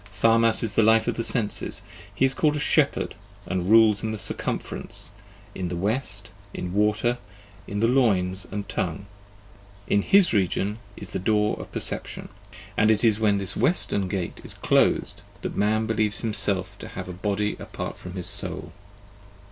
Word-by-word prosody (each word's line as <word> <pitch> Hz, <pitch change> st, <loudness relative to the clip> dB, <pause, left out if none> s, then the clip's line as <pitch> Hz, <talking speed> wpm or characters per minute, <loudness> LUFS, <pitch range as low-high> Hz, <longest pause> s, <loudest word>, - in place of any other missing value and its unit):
Tharmas 115 Hz, 0 st, +4 dB
is 110 Hz, -3 st, -1 dB
the 110 Hz, -, +4 dB
life 110 Hz, 0 st, +4 dB
of -, -, 0 dB
the 115 Hz, -, -2 dB
Senses; 110 Hz, -2 st, +1 dB, 0.3 s
he 135 Hz, -, +3 dB
is 135 Hz, -, +2 dB
called 150 Hz, +1 st, +2 dB
a -, -, -1 dB
Shepherd 145 Hz, 0 st, +2 dB, 0.3 s
and 95 Hz, -1 st, -2 dB
rules 110 Hz, -1 st, +6 dB
in 110 Hz, -, -2 dB
the 110 Hz, -, -4 dB
Circumference, 100 Hz, -, -2 dB, 0.4 s
in 95 Hz, -1 st, -4 dB
the 90 Hz, -, -3 dB
West, 100 Hz, +2 st, -1 dB, 0.2 s
in 90 Hz, 0 st, -4 dB
Water, 105 Hz, +4 st, +1 dB, 0.5 s
in 105 Hz, +1 st, -3 dB
the 115 Hz, -, +4 dB
Loins 100 Hz, -7 st, +2 dB
and 100 Hz, 0 st, -4 dB
Tongue: 90 Hz, +3 st, -3 dB, 0.8 s
in 100 Hz, -, +3 dB
his 195 Hz, -, +4 dB
region 100 Hz, +1 st, 0 dB, 0.2 s
is 100 Hz, -, -8 dB
the -, -, -2 dB
door 105 Hz, +2 st, +2 dB
of -, -, -9 dB
perception, -, -, -3 dB, 0.5 s
and 110 Hz, -, +3 dB
it 110 Hz, 0 st, +3 dB
is 110 Hz, -2 st, +4 dB
when 105 Hz, -2 st, +3 dB
this 100 Hz, -1 st, -2 dB
Western 100 Hz, -, +1 dB
gate 90 Hz, -1 st, -4 dB
is -, -, -8 dB
closed -, -, +2 dB, 0.2 s
that -, -, -4 dB
man 110 Hz, +2 st, +1 dB
believes 110 Hz, -1 st, 0 dB
him 115 Hz, -2 st, -2 dB
self 95 Hz, -3 st, -1 dB
to -, -, -8 dB
have -, -, -7 dB
a 90 Hz, -, -6 dB
body 105 Hz, +2 st, -1 dB
apart -, -, -6 dB
from 90 Hz, -, -8 dB
his 90 Hz, -2 st, -4 dB
soul. -, -, -1 dB
105 Hz, 175 wpm, -25 LUFS, 100-115 Hz, 0.8 s, rules